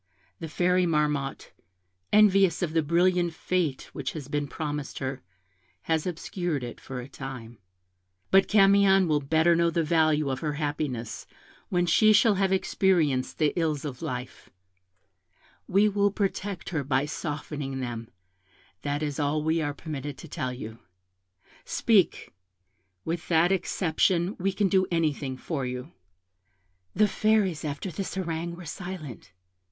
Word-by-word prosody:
The 165 - -5
Fairy 180 +3 +2
Marmotte, 150 -3 -1 0.6
envious 195 -4 +5
of 160 -3 -2
the 165 - +3
brilliant 175 +2 +2
fate 170 -8 -2
which 130 -2 -4
has 145 -4 -7
been 145 0 -1
promised 150 -1 -4
her, 130 0 -4 0.6
has 160 +1 0
obscured 175 -3 -3
it 120 -1 -7
for 130 -1 -6
a 120 - -9
time: 125 -5 -8 0.7
but 195 0 +5
Camion 195 -2 +5
will 150 -2 +2
better 160 +4 +3
know 170 0 +3
the 165 0 0
value 155 -3 +2
of 130 - -3
her 150 0 -2
happiness 145 -5 -3 0.4
when 175 -1 +1
she 215 +5 +5
shall 215 +1 +5
have 195 -1 +1
experienced 170 -8 +1
the 155 -2 +2
ills 155 -4 -1
of 130 -4 -6
life; 125 0 -6 1.2
we 200 +3 +4
will 205 0 +2
protect 200 -1 -3
her 160 -5 -2
by 135 +1 +1
softening 145 -3 -4
them: 120 -3 -5 0.7
that 145 +1 -2
is 145 -1 -3
all 150 +1 0
we 160 +1 +1
are 145 -2 -2
permitted 145 -3 -6
to - - -10
tell 130 -3 -3
you. 115 -2 -8 0.8
Speak; 210 -6 +1 0.7
with 165 0 -3
that 170 +2 +3
exception 180 0 +1
we 195 +2 +1
can 200 +1 +1
do 190 0 +2
anything 150 -6 -1
for 145 0 -3
you.' 125 +4 -5 1.0
"The 210 +2 +4
Fairies, 210 -6 +1
after 150 +5 -4
this 190 +4 -5
harangue, 170 -2 -3
were 175 0 -10
silent. 165 - -7
160 Hz, 145 wpm, -27 LUFS, 145-185 Hz, 1.2 s, envious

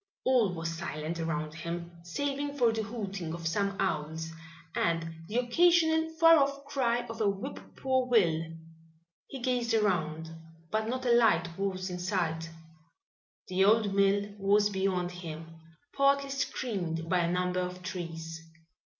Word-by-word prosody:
All 245 -7 +4
was 165 0 -3
silent 165 -1 -4
around 155 -2 -2
him, 170 +1 -5
saving 285 +10 -3
for 240 -4 +4
the 220 - -1
hooting 200 -7 -4
of 170 -1 -4
some 200 +3 0
owls 160 -3 -2 0.4
and 165 -1 -1
the 220 - -2
occasional 320 +5 +4
far 330 0 +7
off 280 -1 +1
cry 240 -4 0
of 225 -1 -6
a 210 - +4
whip 200 +8 -4 0.2
poor 260 -1 +1
will. 175 -10 +3 0.9
He 270 - -7
gazed 245 -2 +1
around, 160 -6 0 0.4
but 220 0 0
not 255 +2 -3
a 245 - +3
light 175 -8 +3
was 185 -1 -2
in 180 - -4
sight. 170 -3 -1 1.0
The 185 +1 +2
old 210 0 +4
mill 200 +1 +2
was 205 +1 +3
beyond 190 -2 0
him, 165 -2 -8 0.3
partly 275 0 +3
screened 185 -12 -2
by 180 +1 +2
a 170 0 +1
number 180 0 0
of 180 0 -4
trees. 165 -3 -5
195 Hz, 145 wpm, -30 LUFS, 165-240 Hz, 1.0 s, far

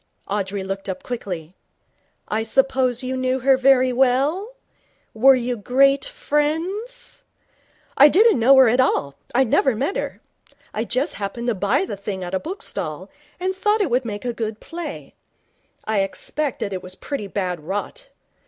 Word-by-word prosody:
Audrey 200 -1 -2
looked 195 +1 -5
up 190 - -5
quickly. 180 -9 -5 0.7
'I 215 +1 -1
suppose 255 +1 +1
you 255 +1 -2
knew 255 0 -1
her 265 +1 +5
very 260 -1 +4
well? 275 - +1 0.6
Were 265 +4 +6
you 245 0 -1
great 275 - +3
friends?' 410 +6 -2 0.8
'I 285 +2 +9
didn't 425 - +5
know 260 +4 +6
her 265 -2 +7
at 240 +3 +2
all. 140 - +2 0.2
I'd 265 0 +4
never 265 0 +3
met 280 - -1
her. - - -4 0.5
I 220 +2 -2
just 260 +7 -1
happened 235 +5 -3
to - - +2
buy 215 - +1
the 205 - -6
thing 195 -1 -5
at 175 +1 -6
a 190 - +1
bookstall, 385 - -4 0.3
and 375 +1 -1
thought 420 +3 +1
it 380 - 0
would 250 +2 +2
make 210 -1 -6
a 240 - -1
good 220 -2 -4
play. 330 -3 -7 0.7
I 215 -1 0
expect 260 +8 -2
it 190 -2 -4
was 185 0 -9
pretty 275 -4 -5
bad 180 -3 -2
rot. 205 - -5
255 Hz, 160 wpm, -22 LUFS, 205-295 Hz, 0.8 s, I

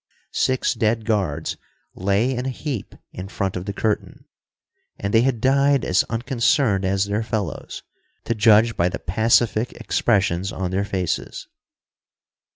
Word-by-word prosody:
Six 130 -1 +1
dead 110 -1 0
guards 100 -10 -1 0.4
lay 100 +7 +1
in 125 +2 -3
a - - 0
heap 130 -3 -5 0.2
in 90 +1 -7
front 95 -1 -3
of 90 0 -4
the 100 - -3
curtain, 105 +1 -2 0.7
and 100 0 -3
they 115 - +6
had 125 -2 +1
died 140 +2 +3
as 90 - +3
unconcerned 115 -3 +1
as 95 +1 +1
their 100 +2 -1
fellows, 110 -7 -4 0.4
to - - -1
judge 110 +1 +4
by 85 +1 +2
the - - -4
pacific 110 +5 +1
expressions 95 -4 0
on 90 -1 -3
their 100 +2 0
faces. 95 -4 -3
105 Hz, 145 wpm, -22 LUFS, 95-120 Hz, 0.7 s, they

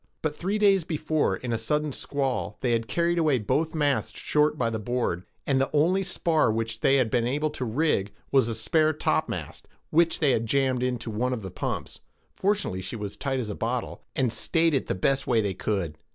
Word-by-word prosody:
But 155 -1 -1
three 195 +6 -1
days 200 -3 +4
before, 155 -1 0
in 125 -2 -4
a 115 - 0
sudden 150 +6 0
squall, 135 -2 -2
they 125 - +1
had 115 -1 0
carried 170 0 +1
away 155 -5 +3
both 150 +9 0
masts 145 -3 0
short 150 0 +2
by 115 -3 0
the 110 - -2
board, 105 -6 -2 0.2
and 135 -1 +2
the 135 - +1
only 170 +6 +3
spar 165 -8 +1
which 115 0 -2
they 135 - +4
had 125 -5 +2
been 120 -1 +2
able 150 +4 0
to 140 - -5
rig 115 -5 +1 0.2
was 135 -4 +4
a 115 - -2
spare 155 +8 +2
topmast, 155 - -2 0.2
which 165 +1 +3
they 145 -3 +3
had 115 -2 0
jammed 130 0 +1
into 125 -2 -2
one 125 +4 0
of 115 -4 -4
the 95 - -6
pumps,—fortunately 190 - -3
she 95 +5 -5
was 105 -3 -4
as - - -11
tight 135 -2 -1
as 110 -4 -3
a - - -3
bottle,—and 120 +2 -2
stayed 165 -1 +2
it 135 - 0
the - - -1
best 135 +9 +1
way 120 -2 +3
they 100 -3 0
could. 95 -5 -2
130 Hz, 210 wpm, -26 LUFS, 115-155 Hz, 0.2 s, days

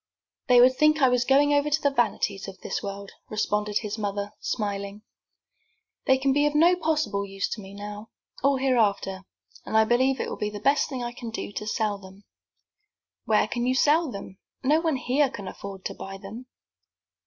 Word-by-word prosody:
"They 250 -1 +6
would 255 +1 +6
think 305 +2 +4
I 265 -3 +5
was 250 -1 +2
going 285 +2 +4
over 285 +1 +2
to 300 +1 +2
the 285 -2 +1
vanities 210 -6 0
of 195 -1 -9
this - - -3
world," 200 0 -6 0.2
responded 210 -1 0
his 210 0 -4
mother, 205 0 -3
smiling. 200 -1 -3 1.0
"They 265 -1 +5
can 270 0 +1
be 290 +1 +3
of 295 - -2
no 340 +4 +5
possible 310 - 0
use 195 0 -3
to 215 - -5
me 195 0 -11
now, 205 +2 -8 0.3
or 275 0 +3
hereafter, 205 -7 +1 0.4
and 220 - 0
I 220 - +6
believe 260 +3 +2
it - - -2
will - - -5
be 210 - -2
the 210 0 -7
best 275 +7 +2
thing 260 -4 -4
I 240 - -3
can 240 -1 -7
do 225 - -5
to 210 +1 -6
sell 215 -2 -1
them." 190 +1 -14 1.0
"Where 215 -1 +3
can 240 +2 -2
you 255 - +2
sell 305 +4 +3
them? 195 -2 -9 0.2
No 300 +5 +3
one 325 -3 +1
here 265 +2 +1
can 200 -5 -8
afford 195 0 -8
to - - -3
buy 195 0 -8
them." 220 +6 -10
225 Hz, 200 wpm, -26 LUFS, 200-270 Hz, 1.0 s, They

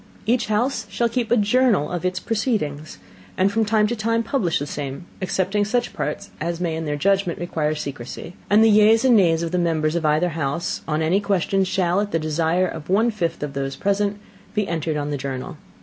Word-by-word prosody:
Each 235 +3 +1
house 220 +1 0
shall 235 +2 0
keep 230 -1 -1
a 240 - +4
Journal 215 - +2
of 175 -1 -3
its 185 0 -1
Proceedings, 170 - -2 0.4
and 190 +2 +3
from 225 +1 +1
time 215 0 +3
to 235 +3 -1
time 230 +1 0
publish 225 - 0
the 145 - -3
same, 145 +2 -5 0.2
excepting 190 +2 0
such 240 +3 -1
Parts 150 - -4
as 170 +1 -2
may 170 -3 -1
in 160 0 -4
their 145 -1 -1
Judgment 195 +2 +1
require 155 -3 -1
Secrecy; 140 +2 -6 0.2
and 210 +2 +6
the 225 - +6
Yeas 215 +3 +5
and 250 -2 +6
Nays 170 -5 +3
of 165 - -3
the 180 - +1
Members 160 -3 +1
of 170 - -1
either 155 +3 +2
House 160 +1 -2
on 155 0 0
any 175 +5 +2
question 195 -1 +1
shall, 185 0 +1
at 205 - -2
the 165 - 0
Desire 160 +3 +1
of 160 -2 -8
one 220 +5 +3
fifth 170 -8 -2
of 145 -2 -4
those 135 -1 -3
Present, 200 +1 0 0.4
be 210 -2 0
entered 160 -2 -2
on 145 0 -3
the 145 - -1
Journal. 135 +5 -5
180 Hz, 210 wpm, -22 LUFS, 155-210 Hz, 0.4 s, and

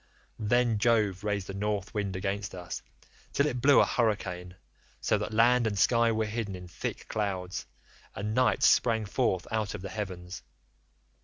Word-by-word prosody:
Then 115 0 +2
Jove 105 -4 +2
raised 105 -2 -1
the 95 - -6
North 100 0 -2
wind 100 -3 -2
against 95 +1 -3
us 90 -1 -6 0.5
till 140 - +3
it 125 -5 -1
blew 140 +2 +6
a - - +6
hurricane, 90 -6 -1 0.4
so - - +1
that - - -3
land 120 +2 +4
and 100 -2 -2
sky 115 +3 +4
were 110 0 0
hidden 105 -2 -3
in 90 0 -9
thick 85 - -5
clouds, 95 -4 -3 0.5
and 105 +2 -3
night 125 +2 +2
sprang 110 -2 +4
forth 100 -4 0
out 110 -2 -1
of - - -8
the 100 - -5
heavens. 95 -3 -6
105 Hz, 165 wpm, -29 LUFS, 95-115 Hz, 0.5 s, blew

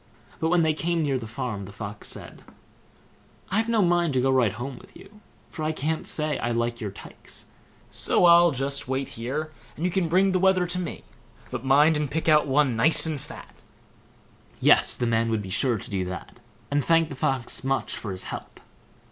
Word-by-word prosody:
But 160 - 0
when 175 -1 +3
they 155 -1 +2
came 165 +1 -1
near 135 -3 0
the 115 - -7
farm, 110 -4 -5
the 100 - -10
Fox 100 0 -6
said: - - -7 1.1
"I've 220 +4 +1
no 225 -3 +3
mind 175 -3 +2
to - - +3
go 135 +1 +2
right 125 -6 +3
home 125 +3 -6
with - - -16
you, 210 +1 -16 0.3
for 155 - -6
I 155 - 0
can't 155 +1 -2
say 150 -2 -1
I 120 - -2
like 120 0 -1
your 105 - -3
tykes; 95 - -13 0.5
so - - +2
I'll 170 0 +7
just 140 -1 -2
wait 135 +1 -2
here, 140 +7 -4 0.2
and 165 - -3
you 180 - +1
can 175 -2 0
bring 190 +3 +3
the 185 - +1
wether 190 -1 +3
to 175 +1 -2
me, 175 -4 -5 0.5
but 125 -2 -4
mind 145 +4 +4
and 150 -2 -2
pick 160 +4 -3
out 150 -2 +5
one 135 -2 +2
nice 155 +10 +4
and 155 -4 -3
fat." 150 +3 -12 1.0
Yes! - - +4
the 120 - -1
man 115 0 +1
would 110 -2 -1
be 95 - -8
sure 120 +3 +1
to - - -9
do 95 -2 -1
that, 90 -1 -8 0.3
and 145 0 +1
thanked 165 -2 +3
the - - -5
Fox 130 -1 -1
much 135 0 -1
for 105 - -6
his 95 - -4
help. - - -8
140 Hz, 205 wpm, -25 LUFS, 120-165 Hz, 1.1 s, I'll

